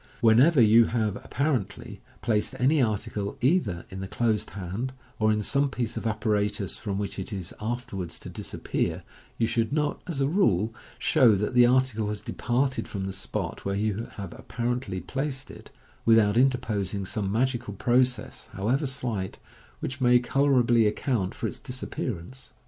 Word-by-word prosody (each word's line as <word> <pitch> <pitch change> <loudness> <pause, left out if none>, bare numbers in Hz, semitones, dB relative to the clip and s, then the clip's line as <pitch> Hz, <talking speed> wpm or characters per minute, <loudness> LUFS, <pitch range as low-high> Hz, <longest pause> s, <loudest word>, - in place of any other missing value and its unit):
Whenever 130 +7 +5
you 115 0 +7
have 110 -4 0
(apparently) 140 -9 -2 0.2
placed 110 +3 0
any 135 +4 +3
article 105 -3 -2
either 125 - +1
in 95 - -6
the 95 - -4
closed 110 -1 0
hand, 100 +8 -4 0.3
or 110 0 +3
in 105 0 0
some 140 +5 +2
piece 120 -3 -3
of - - -2
apparatus 105 -3 0
from 100 -3 -3
which 100 -1 -3
it 95 - -5
is 95 -4 -5
afterwards 105 -7 -4
to - - -9
disappear, - - -3 0.3
you 115 - +2
should 115 +1 0
not, 150 0 0
as 165 -6 -3
a 135 - +2
rule, 115 - +2 0.2
show 115 -5 +5
that 105 +4 -1
the 125 -1 +7
article 125 -4 +2
has 105 0 -4
departed 130 +5 -1
from 95 -2 -4
the 95 - -4
spot 95 0 -4
where 100 0 -1
you 105 +2 -1
have 100 -4 -6
apparently 120 -4 -3
placed 135 - -4
it, - - -12 0.3
without 110 -2 +5
interposing 110 -7 +1
some 100 0 -2
magical 120 -2 0
process, 125 +4 +1
however 125 - 0
slight, 115 -8 -3 0.4
which 130 0 -4
may 125 -1 +6
colourably 120 -3 +3
account 105 -3 -1
for - - -4
its - - -3
disappearance. 125 -3 -6
115 Hz, 160 wpm, -27 LUFS, 100-130 Hz, 0.4 s, you